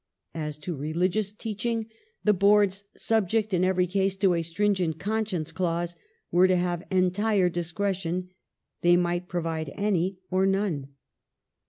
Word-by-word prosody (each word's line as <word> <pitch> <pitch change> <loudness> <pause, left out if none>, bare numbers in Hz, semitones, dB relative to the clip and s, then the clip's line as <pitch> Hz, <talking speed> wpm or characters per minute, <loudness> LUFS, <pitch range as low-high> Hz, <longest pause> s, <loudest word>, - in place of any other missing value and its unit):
As 150 -2 -4
to 170 +3 -5
religious 180 +8 0
teaching 225 +1 -3 0.4
the 210 - +5
Boards 200 0 +3
— - - -28
subject 220 -1 +1
in 180 0 +2
every 185 -1 +3
case 190 +1 0
to 190 -2 +3
a 170 - +1
stringent 175 -1 0
conscience 205 -4 -2
clause 175 -1 -1 0.2
— 465 - -45
were 180 +2 +5
to 185 - +3
have 175 -1 -1
entire 190 +1 +2
discretion; 180 +1 -2 0.5
they 175 0 +5
might 175 0 0
provide 165 -4 -2
any 195 -2 0
or 190 +1 +3
none. 195 -8 0
185 Hz, 145 wpm, -27 LUFS, 175-200 Hz, 0.5 s, the